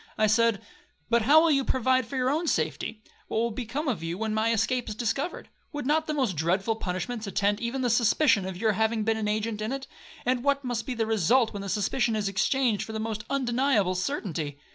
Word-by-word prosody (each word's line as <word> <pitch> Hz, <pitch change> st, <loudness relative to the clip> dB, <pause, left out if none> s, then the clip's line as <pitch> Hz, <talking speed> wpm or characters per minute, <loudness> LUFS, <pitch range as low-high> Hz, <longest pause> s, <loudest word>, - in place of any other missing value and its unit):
I 215 Hz, -, +3 dB
said, 225 Hz, 0 st, +2 dB, 0.5 s
'But 235 Hz, 0 st, +4 dB
how 285 Hz, +8 st, +6 dB
will 335 Hz, -, +4 dB
you 275 Hz, -2 st, +3 dB
provide 260 Hz, -1 st, +1 dB
for 270 Hz, -, -7 dB
your 255 Hz, +1 st, +1 dB
own 325 Hz, +4 st, -1 dB
safety? 215 Hz, -6 st, -2 dB, 0.2 s
What -, -, -3 dB
will 230 Hz, +1 st, +1 dB
become 255 Hz, +7 st, -4 dB
of 225 Hz, -, -1 dB
you 165 Hz, +2 st, -4 dB
when 220 Hz, +1 st, -2 dB
my 220 Hz, +1 st, +1 dB
escape 230 Hz, +2 st, 0 dB
is 210 Hz, -, -5 dB
discovered? 270 Hz, -, -2 dB, 0.3 s
Would 290 Hz, -3 st, -4 dB
not 310 Hz, +3 st, +1 dB
the 305 Hz, -, -1 dB
most 255 Hz, -, 0 dB
dreadful 190 Hz, +8 st, 0 dB
punishments 210 Hz, +4 st, -4 dB
attend 200 Hz, +1 st, +1 dB
even 240 Hz, +3 st, -2 dB
the 250 Hz, -, +1 dB
suspicion 230 Hz, -2 st, +3 dB
of 190 Hz, -2 st, -5 dB
your 220 Hz, +3 st, +2 dB
having 220 Hz, +1 st, 0 dB
been 220 Hz, +1 st, +1 dB
an 215 Hz, -1 st, -2 dB
agent 215 Hz, 0 st, -1 dB
in 215 Hz, +3 st, -2 dB
it, 270 Hz, 0 st, -4 dB, 0.4 s
and 250 Hz, 0 st, +1 dB
what 280 Hz, 0 st, +1 dB
must 240 Hz, -3 st, -3 dB
be 255 Hz, -, -2 dB
the 225 Hz, -1 st, 0 dB
result 225 Hz, +3 st, +2 dB
when 200 Hz, -, -5 dB
that 200 Hz, -, -5 dB
suspicion 220 Hz, +3 st, 0 dB
is 210 Hz, -2 st, -1 dB
exchanged 220 Hz, +3 st, +1 dB
for 220 Hz, -, -8 dB
the 220 Hz, -, -3 dB
most 220 Hz, 0 st, -4 dB
undeniable 245 Hz, -7 st, +1 dB
certainty?' 180 Hz, -, -3 dB
225 Hz, 225 wpm, -27 LUFS, 210-260 Hz, 0.5 s, how